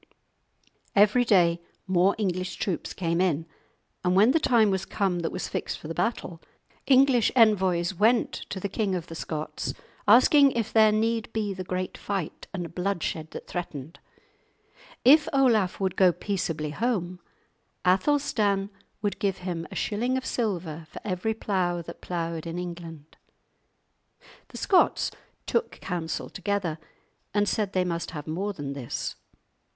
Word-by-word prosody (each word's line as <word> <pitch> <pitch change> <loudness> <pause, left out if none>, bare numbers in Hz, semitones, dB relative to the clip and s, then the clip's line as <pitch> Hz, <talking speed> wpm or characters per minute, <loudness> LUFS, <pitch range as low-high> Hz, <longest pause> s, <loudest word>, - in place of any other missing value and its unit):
Every 210 +4 +5
day 175 -7 +3 0.2
more 185 +1 +3
English 185 -3 -2
troops 185 -4 -3
came 170 -1 -1
in, 165 -4 +1 0.6
and 180 0 +2
when 210 +6 +6
the 325 - +3
time 235 -8 +4
was 190 -1 -1
come 190 -4 -1
that 165 - -2
was - - -4
fixed - - -3
for - - -10
the 165 - -4
battle, 180 -6 -2 0.5
English 260 -4 +5
envoys 190 -6 +4
went 225 +6 +3 0.2
to 190 - -4
the 200 - -2
King 200 -1 -1
of 175 -2 -4
the 165 - -10
Scots 155 -1 -4 0.3
asking 270 +5 +7
if 225 -2 -2
there 220 -1 +6
need 225 +1 0
be 210 -3 -1
the 185 -1 -5
great 185 0 -4
fight 195 -6 -4
and 175 -4 -5
bloodshed 180 -4 -2
that - - -8
threatened; 165 -3 -6 1.1
if 300 +4 +7
Olaf 230 -9 +3
would 190 -2 -1
go 185 -2 +5
peaceably 165 -6 -3
home, 185 -2 -1 0.7
Athelstan 200 -2 +2 0.3
would 205 - -1
give 195 -2 0
him 165 -3 -3
a - - -9
shilling 245 +5 0
of 260 - -4
silver 170 -8 -3
for - - -9
every 210 +2 -1
plough 180 -5 -1
that - - -10
ploughed 170 -2 -3
in 165 +1 -4
England. 170 -3 -8 1.3
The - - -10
Scots 375 - +3 0.3
took 470 - 0
counsel 175 -3 -3
together 195 -4 -2 0.6
and 205 0 +3
said 205 -3 -1
they 185 -1 +2
must 170 -1 -2
have 150 -4 -7
more 185 +6 -2
than 145 -5 -5
this. 135 -4 -4
190 Hz, 150 wpm, -27 LUFS, 170-215 Hz, 1.3 s, asking